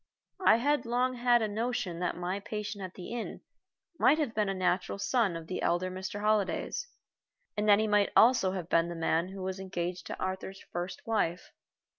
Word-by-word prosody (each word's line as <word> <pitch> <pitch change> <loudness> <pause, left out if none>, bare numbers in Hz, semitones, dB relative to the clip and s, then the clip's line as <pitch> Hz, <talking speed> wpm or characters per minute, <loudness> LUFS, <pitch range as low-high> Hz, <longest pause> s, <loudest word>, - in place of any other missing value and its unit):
I 220 - +7
had 285 +2 +1
long 250 +2 +1
had 240 -1 +3
a - - +1
notion 215 -5 -2
that 180 -1 -1
my 180 +3 -2
patient 210 0 -5
at 185 -1 -7
the 180 - -8
inn 235 -2 -5 0.6
might 290 - +5
have 290 -8 -1
been 210 -2 +1
a - - 0
natural 185 +1 0
son 205 -3 +1
of 165 -1 -6
the 185 +3 -4
elder 180 +2 +1
Mr. 190 +2 -5
Holliday's, 215 - 0 0.7
and 210 0 0
that 205 - +8
he 215 - +1
might 210 -1 +3
also 225 -6 +5
have 180 -3 -4
been 165 0 +2
the 170 - -5
man 165 +1 +1
who 190 0 -7
was 190 0 -3
engaged 180 -2 -4
to - - -6
Arthur's 190 +1 -4
first 175 +1 -5
wife. 195 -6 -1
195 Hz, 195 wpm, -30 LUFS, 180-225 Hz, 0.7 s, that